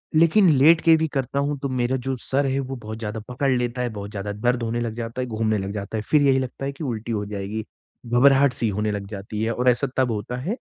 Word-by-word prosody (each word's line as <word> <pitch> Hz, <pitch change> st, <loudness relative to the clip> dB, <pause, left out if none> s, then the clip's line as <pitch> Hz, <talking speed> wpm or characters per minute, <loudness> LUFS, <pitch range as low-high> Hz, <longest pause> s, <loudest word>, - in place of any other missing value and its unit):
लेकिन 170 Hz, +4 st, +5 dB
लेट 160 Hz, +5 st, +6 dB
के 165 Hz, -1 st, +6 dB
भी 160 Hz, 0 st, 0 dB
करता 135 Hz, -2 st, -2 dB
हूँ 145 Hz, +1 st, -1 dB
तो 140 Hz, 0 st, -3 dB
मेरा 130 Hz, 0 st, 0 dB
जो 135 Hz, -, 0 dB
सर 140 Hz, +1 st, 0 dB
है 135 Hz, 0 st, 0 dB
वो 135 Hz, 0 st, -4 dB
बहुत 110 Hz, -3 st, -7 dB
ज़्यादा 110 Hz, 0 st, -4 dB
पकड़ 130 Hz, +3 st, -1 dB
लेता 125 Hz, 0 st, -1 dB
है, 125 Hz, -, -1 dB
बहुत 100 Hz, -2 st, -7 dB
ज़्यादा 105 Hz, -1 st, -4 dB
दर्द 120 Hz, +4 st, 0 dB
होने 115 Hz, +1 st, -1 dB
लग 115 Hz, -2 st, -2 dB
जाता 115 Hz, +1 st, -4 dB
है, 125 Hz, -, -3 dB
घूमने 110 Hz, -1 st, 0 dB
लग 95 Hz, 0 st, -3 dB
जाता 105 Hz, +1 st, -4 dB
है 105 Hz, -, -3 dB
फिर 150 Hz, -, +5 dB
यही 135 Hz, -2 st, +4 dB
लगता 130 Hz, +1 st, -4 dB
है 140 Hz, -, -2 dB
कि 140 Hz, +3 st, -8 dB
उल्टी 115 Hz, -4 st, -3 dB
हो 105 Hz, -2 st, -1 dB
जाएगी। 100 Hz, +1 st, -4 dB, 0.4 s
घबराहट-सी 125 Hz, 0 st, +4 dB
होने 105 Hz, +1 st, -1 dB
लग 100 Hz, -1 st, -4 dB
जाती 105 Hz, +1 st, -5 dB
है 115 Hz, -, 0 dB
और 125 Hz, +2 st, +2 dB
ऐसा 125 Hz, +3 st, +2 dB
तब 130 Hz, -2 st, +2 dB
होता 110 Hz, +3 st, -3 dB
है 190 Hz, -, -2 dB
120 Hz, 260 wpm, -23 LUFS, 110-135 Hz, 0.4 s, लेट